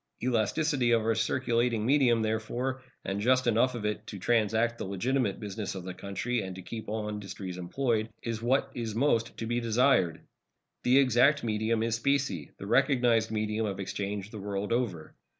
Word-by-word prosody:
Elasticity 125 +3 +1
to - - +4
our 115 0 +1
circulating 115 0 +1
medium, 125 -4 +4
therefore, 120 +4 -2 0.2
and 100 +1 -2
just 130 +3 +3
enough 120 +2 +3
of 110 -3 -4
it 105 +1 -3
to 105 - -6
transact 115 +3 +1
the - - -3
legitimate 105 +3 -1
business 105 -1 -5
of 95 - -6
the 90 0 -6
country 100 +6 -2
and 95 -2 -6
to 95 - -9
keep 110 +2 -7
all 110 0 -2
industries 100 -3 -6
employed, 110 +4 -1
is 115 -1 -3
what 135 +3 +1
is 115 -3 -4
most 115 -3 +1
to 115 - -4
be 120 +1 0
desired. 115 -6 +2 0.6
The 125 +2 +4
exact 140 +2 +4
medium 110 0 0
is 115 0 0
specie, 140 - 0
the - - -8
recognized 120 -2 +3
medium 110 0 -1
of 100 -1 -4
exchange 100 +1 -4
the 110 - -7
world 100 +2 -2
over. 100 -10 -2
115 Hz, 175 wpm, -29 LUFS, 105-125 Hz, 0.6 s, to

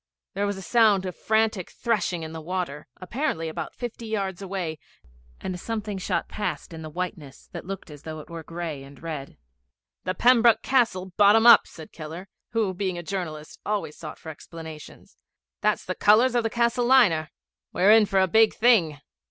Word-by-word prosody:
There 200 +1 -1
was 200 -1 -2
a 190 - -8
sound 215 -3 +4
of 185 - -5
frantic 220 -4 0
threshing 185 -7 -1
in 160 - -6
the 160 - -6
water, 170 -3 -4
apparently 185 - -2
about 160 - -6
fifty 235 -1 -6
yards 195 -4 -3
away, 180 -5 -4 0.6
and 180 -1 -5
something 215 -1 -4
shot - - -1
past 180 -6 -4
in 160 - -8
the 155 - -7
whiteness 155 -5 -6
that - - -8
looked 195 -4 -7
as 145 -1 -11
though 155 0 -7
it 150 - -11
were 165 -1 -7
gray 165 -3 -6
and 135 0 -13
red. 150 -4 -6 0.7
'The 185 - -1
Pembroke 235 -2 +5
Castle 225 -8 +1
bottom 210 +2 +6
up,' 235 - +8
said 160 -2 -12
Keller, 165 +4 -8 0.2
who, 220 -4 0
being 185 -1 -2
a 175 - -6
journalist, 160 -5 -5
always 205 -7 -2
sought 155 - -8
for 160 - -10
explanations. 160 0 -11 0.4
'That's - - +1
the - - -2
colours 230 +5 +4
of 240 -1 +2
a - - -4
Castle 235 +1 +1
liner. 185 -12 +4 0.4
We're 190 +4 +4
in 220 -1 +6
for 195 -1 +2
a 190 - +4
big 220 +4 +4
thing.' 180 - +3
185 Hz, 185 wpm, -25 LUFS, 160-220 Hz, 0.7 s, up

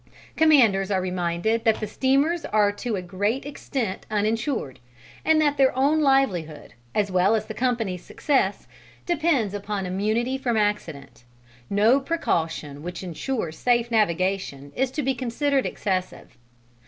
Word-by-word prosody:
Commanders 235 -12 +4
are 195 -2 +1
reminded 180 +4 -1
that 225 -2 +2
the 215 - -2
steamers 275 - +1
are 210 -1 +2
to 220 +2 -4
a 185 - -4
great 205 +9 -2
extent 265 -7 -4
uninsured, 215 - -1 0.4
and 320 0 +4
that 290 -2 +2
their 265 -1 +3
own 285 +4 +3
livelihood, 195 - +1 0.2
as 200 -2 +1
well 185 +4 +3
as 215 -1 -1
the - - -6
company's 230 -8 -1
success, 260 -9 0 0.4
depends 310 - +1
upon 205 -1 -3
immunity 215 +8 -1
from 240 -4 0
accident; 160 - -2 0.5
no 215 +7 +4
precaution 165 - -2
which 175 +3 -6
ensures 180 - -3
safe 240 -1 +1
navigation 185 -8 0
is 265 0 +1
to 295 +3 -3
be 270 +1 +1
considered 265 +3 0
excessive. 185 -3 -3
215 Hz, 140 wpm, -24 LUFS, 185-265 Hz, 0.5 s, Commanders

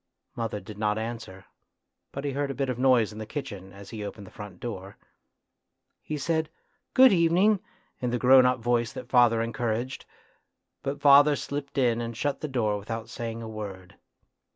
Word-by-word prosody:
Mother 115 -3 -3
did 105 0 -11
not 105 0 +1
answer, 110 -4 -6 0.7
but 140 +1 -5
he 140 - 0
heard 140 +1 -2
a 135 - -4
bit 135 -1 -1
of 125 -1 -3
noise 125 -5 +4
in 105 - -9
the 110 - -5
kitchen 100 -7 -6
as 100 0 -12
he 110 -2 -5
opened 100 0 -7
the - - -14
front 100 -4 -10
door. 100 -5 -7 1.0
He 155 - -4
said 160 +1 0 0.2
" - - -46
Good 260 -3 +8
evening 185 +4 +4 0.2
" - - -40
in 125 - 0
the 125 - 0
grown 130 +1 +7
up 125 - +2
voice 120 +1 0
that 125 -1 -8
father 120 -2 +4
encouraged, 115 +2 -3 0.7
but 140 +1 -4
father 145 +1 +7
slipped 140 0 -5
in 120 -3 +2
and 115 -1 -5
shut 145 +2 -1
the 155 - -2
door 110 -7 0
without 115 +2 -6
saying 115 -1 -5
a - - -6
word. 100 -4 -7
120 Hz, 190 wpm, -27 LUFS, 110-140 Hz, 1.0 s, Good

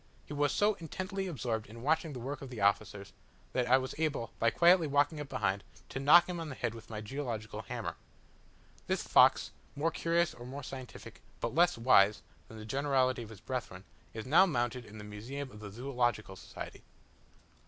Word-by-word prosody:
He - - -8
was 145 0 +1
so 210 +1 +3
intently 190 +3 -4
absorbed 115 -9 -3
in 115 +3 -11
watching 160 +1 +1
the 125 - -6
work 135 +3 -5
of 135 - -7
the 120 -3 -7
officers, 100 0 0 0.4
that 125 -1 +1
I 130 +2 +6
was 130 0 -3
able, 145 -8 -1
by 115 - +4
quietly 170 +4 +5
walking 145 +2 +2
up 145 -2 -6
behind, 100 -2 -1 0.3
to 135 - -4
knock 150 +6 +7
him 180 -2 -4
on 165 -2 -5
the 135 - -6
head 120 -3 -2
with 115 0 -12
my 110 -1 -5
geological 110 -3 -4
hammer. 100 - -5 0.9
This - - 0
fox, - - +5 0.2
more 155 +3 0
curious 170 +1 +1
or 120 - -11
more 140 +2 -7
scientific, 130 -2 -9 0.2
but - - -2
less 170 0 +4
wise, 105 -4 +5 0.2
than 110 - -11
the 110 - -8
generality 130 0 +1
of 115 - -8
his 110 -3 -12
brethren, 115 -8 -5 0.3
is 110 -1 -6
now 165 +9 +6
mounted 120 -5 -1
in 110 +1 -12
the 105 - -8
museum 125 +7 -6
of 105 - -12
the 105 -1 -8
Zoological 120 -3 -1
Society. - - -9
130 Hz, 195 wpm, -32 LUFS, 110-145 Hz, 0.9 s, knock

